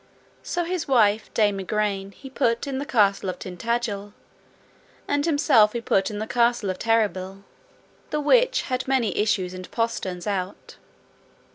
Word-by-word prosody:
So 350 - -2
his 345 -2 -3
wife 220 -5 +3
Dame 205 -3 +2
Igraine 200 0 -2
he 270 - -12
put 245 -2 0
in 270 -2 -3
the 285 - -5
castle 200 -6 +2
of 185 - -4
Tintagil, 205 +1 -3 0.9
and 285 +1 0
himself 285 -9 +4
he 235 - -3
put 195 -4 +1
in 210 - -6
the 215 - -3
castle 235 -3 +1
of 185 - -7
Terrabil, 200 -4 0 0.7
the 300 - -1
which - - +3
had 255 0 -3
many 260 -5 +1
issues 200 -4 0
and 185 0 -8
posterns 200 -6 -3
out. 195 -2 -4
220 Hz, 150 wpm, -24 LUFS, 195-260 Hz, 0.9 s, himself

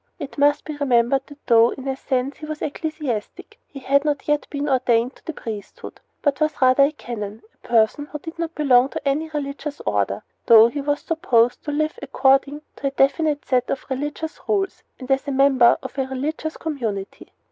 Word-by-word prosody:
It 285 -5 -7
must 290 +1 +3
be 305 - -5
remembered 265 -1 +2
that 290 0 -15
though, 230 -1 +5
in 265 0 -8
a 265 - -1
sense, 265 +1 -2
he 305 - -8
was 305 0 -5
an - - 0
ecclesiastic, 295 -8 -5
he 285 - -12
had 280 +2 +2
not 295 -2 -2
yet 295 0 +1
been 285 0 -3
ordained 250 -2 +1
to - - -25
the - - -3
priesthood, 215 -9 -8 0.2
but 285 -2 0
was 310 -1 0
rather 260 +1 +5
a 285 - 0
canon 220 -7 -7
a - - -38
person 235 +5 +2
who 300 - -6
did 325 +3 -10
not 335 0 -3
belong 265 -4 +4
to 285 - -5
any 305 +3 0
religious 290 0 -5
order, 100 -1 0 0.2
though 225 0 +8
he 285 +4 -4
was 290 +1 -1
supposed 245 -8 +1
to 295 - -2
live 310 +8 -1
according 275 +2 +2
to 275 - -2
a - - +2
definite 290 +2 +1
set 250 -1 +1
of 270 - -3
religious 295 +4 -4
rules 390 -2 -1 0.2
and 260 0 -6
as 270 +2 +1
a - - -1
member 265 -3 +5
of 260 - -7
a 265 - 0
religious 300 +4 -4
community. 225 -11 -5
275 Hz, 200 wpm, -22 LUFS, 250-300 Hz, 0.2 s, though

